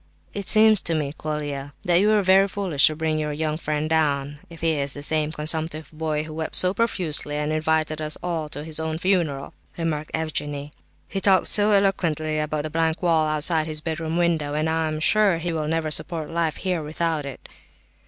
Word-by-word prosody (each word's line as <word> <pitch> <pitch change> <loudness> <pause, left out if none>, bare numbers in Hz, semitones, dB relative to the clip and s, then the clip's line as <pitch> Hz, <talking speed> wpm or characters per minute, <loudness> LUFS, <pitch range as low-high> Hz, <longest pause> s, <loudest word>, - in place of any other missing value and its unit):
"It 200 -2 -5
seems 215 -1 +7
to 165 - +1
me, 145 -3 -2
Mr. - - -33
Colia, 145 -2 -4
that 175 -1 +3
you 205 - +3
were 215 -1 +3
very 190 +1 +5
foolish 185 -7 +3
to 155 - -1
bring 155 0 -1
your 150 -1 -2
young 155 0 -2
friend 150 -1 -2
down—if 150 0 -2
he 165 0 +2
is 140 -1 -1
the 145 - -7
same 155 0 +1
consumptive 155 0 -2
boy 155 -1 -2
who 155 0 -9
wept 160 0 -4
so 185 0 +5
profusely, 175 -10 +1
and 150 +1 -2
invited 155 0 0
us 155 0 -1
all 165 -4 -3
to 145 0 -6
his 160 0 -2
own 160 0 -3
funeral," 165 -7 -1 0.2
remarked 155 -3 -3
Evgenie 145 -2 -4
Pavlovitch. - - -21 0.4
"He 195 - -2
talked 195 -1 +3
so 210 0 +6
eloquently 165 -7 +1
about 150 0 -2
the 155 - -5
blank 165 +2 -1
wall 160 -3 +2
outside 155 +1 0
his 155 -1 -4
bedroom 160 +1 -3
window, 165 -4 0
that 155 +1 -1
I'm 160 -1 -1
sure 200 +2 +3
he 170 +1 -3
will 155 -2 -2
never 160 -1 -1
support 160 -1 -4
life 165 -2 -1
here 180 -3 -2
without 155 0 -2
it." 135 - -10
155 Hz, 205 wpm, -23 LUFS, 150-170 Hz, 0.4 s, seems